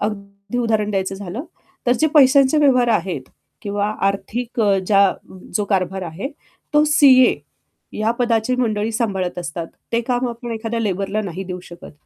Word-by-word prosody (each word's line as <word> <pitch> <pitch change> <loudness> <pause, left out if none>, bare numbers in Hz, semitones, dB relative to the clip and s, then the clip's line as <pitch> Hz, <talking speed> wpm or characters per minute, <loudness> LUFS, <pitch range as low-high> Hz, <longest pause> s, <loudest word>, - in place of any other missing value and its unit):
अगदी 200 +1 -5
उदाहरण 220 -3 0
द्यायचं 195 -1 -1
झालं, 200 - -6 0.4
तर 245 - +5
जे 315 - +4
पैशांचे 275 +1 +6
व्यवहार 255 -5 +4
आहेत 180 - -1 0.3
किंवा 205 0 -1 0.2
आर्थिक 230 +5 -3
अ, 200 -3 +3
ज्या 200 -2 +4 0.4
जो 210 - 0
कारभार 190 -1 -1
आहे 180 - -5 0.5
तो 295 - +6
सीए 275 -4 +6 0.6
या 215 +1 0
पदाची 235 0 +1
मंडळी 220 -3 0
सांभाळत 195 -6 -2
असतात. 170 -1 -5 0.3
ते 235 - +2
काम 245 +1 -1
आपण 235 0 -6
एखाद्या 225 +1 -3
लेबरला 200 0 -1
नाही 190 -1 -5
देऊ 180 -1 -6
शकत. 175 -1 -12
215 Hz, 155 wpm, -20 LUFS, 195-245 Hz, 0.6 s, पैशांचे